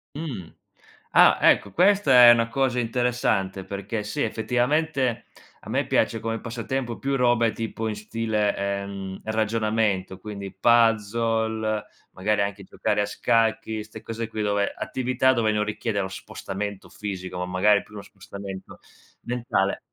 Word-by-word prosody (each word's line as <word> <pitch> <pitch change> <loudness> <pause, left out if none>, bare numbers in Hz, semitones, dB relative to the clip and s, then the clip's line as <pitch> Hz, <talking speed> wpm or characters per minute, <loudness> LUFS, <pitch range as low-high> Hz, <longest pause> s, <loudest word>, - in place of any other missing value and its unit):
Mh. 130 - -5 0.6
Ah, - - +6
ecco, 100 - +4
questa 150 - +6
è - - +11
una 115 -1 +2
cosa 130 0 0
interessante, 115 -6 0
perché 100 +2 -4
sì, 105 +8 -2
effettivamente 125 +2 0 0.4
a - - -9
me - - 0
piace 115 - +1
come 115 +1 -2
passatempo 120 +1 -4
più 135 0 -1
robe 120 -2 +3
tipo 115 0 -4
in 105 - -3
stile, 105 -2 -1
uhm, 95 -1 -7
ragionamento, 110 -3 0
quindi 100 -1 -7
puzzle, 110 0 +2 0.3
magari 105 +2 0
anche 100 0 -4
giocare 105 +2 -1
a - - -1
scacchi, 110 0 0
'ste 110 +1 -11
cose 115 0 -5
qui 110 - -4
dove 100 -1 0
attività 130 0 +1
dove 115 -4 +1
non 105 0 +1
richiede 105 0 -2
lo 95 - -2
spostamento 100 +1 -6
fisico, 95 -3 -6
ma 90 - -2
magari 100 +3 +3
più 105 - -18
uno 100 - -7
spostamento 100 -1 -9 0.4
mentale. 120 -5 -1
110 Hz, 140 wpm, -25 LUFS, 100-120 Hz, 0.6 s, è